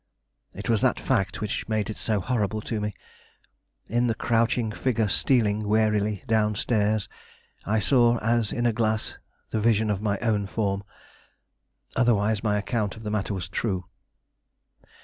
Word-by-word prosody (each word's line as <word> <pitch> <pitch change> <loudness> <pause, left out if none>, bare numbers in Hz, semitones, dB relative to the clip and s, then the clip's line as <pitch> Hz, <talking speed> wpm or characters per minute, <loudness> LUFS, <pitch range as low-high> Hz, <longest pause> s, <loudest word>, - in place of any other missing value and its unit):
It - - -6
was 115 -3 +2
that - - +2
fact 95 - 0
which 105 +1 -3
made 110 -2 0
it - - -8
so 105 -3 0
horrible 110 -2 -1
to 110 0 -3
me. 105 -2 -3 0.9
In 120 +2 +1
the 115 - 0
crouching 115 0 +1
figure 115 -1 0
stealing 105 -2 +2
warily 105 -1 +1
down 110 -3 +2
stairs, 105 -1 +1 0.6
I 110 +2 +1
saw 120 +1 +4
as 115 -1 +1
in 120 - -1
a 120 - +3
glass 110 -1 -1 0.3
the 110 - 0
vision 110 -1 +3
of 100 -1 -2
my 100 -2 0
own 105 -3 0
form. 100 -1 -1 1.1
Otherwise 110 -4 +2
my 105 -2 +2
account 105 0 -2
of 110 - -10
the 105 - -3
matter 105 -1 -1
was 95 - -4
true. 95 -5 -2
110 Hz, 155 wpm, -26 LUFS, 105-115 Hz, 1.1 s, saw